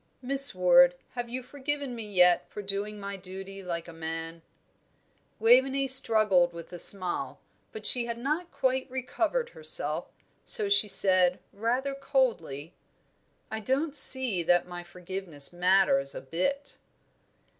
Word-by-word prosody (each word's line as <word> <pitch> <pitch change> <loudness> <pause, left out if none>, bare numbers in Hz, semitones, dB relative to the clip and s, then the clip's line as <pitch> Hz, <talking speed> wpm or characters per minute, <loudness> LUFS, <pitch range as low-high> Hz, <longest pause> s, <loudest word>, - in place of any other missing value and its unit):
"Miss 275 -2 +4
Ward, 180 -1 +5 0.2
have 245 -1 -6
you 255 +1 -6
forgiven 285 0 -5
me 235 - -7
yet 180 -2 +3
for 210 - -8
doing 200 +2 -3
my 200 0 -6
duty 195 +1 -8
like 170 -2 -5
a 170 - -11
man?" 165 0 -7 1.0
Waveney 260 +4 +3
struggled 215 -9 +4
with 170 +1 -11
a 175 - -7
smile, 185 -2 +1 0.3
but 440 - -9
she 245 -2 +3
had 235 -1 -5
not 305 +8 -3
quite 260 0 -1
recovered 330 - -2
herself, 475 0 -2 0.3
so 420 -3 +3
she 400 - +3
said, 185 -3 +3 0.2
rather 245 +6 -2
coldly, 220 - -2 0.8
"I 220 - -4
don't 275 +7 -2
see 260 -9 +4
that 175 +1 +2
my 175 0 -8
forgiveness 175 -3 -7
matters 175 -6 +2
a - - -6
bit!" 185 - -4
205 Hz, 135 wpm, -27 LUFS, 175-260 Hz, 1.0 s, Ward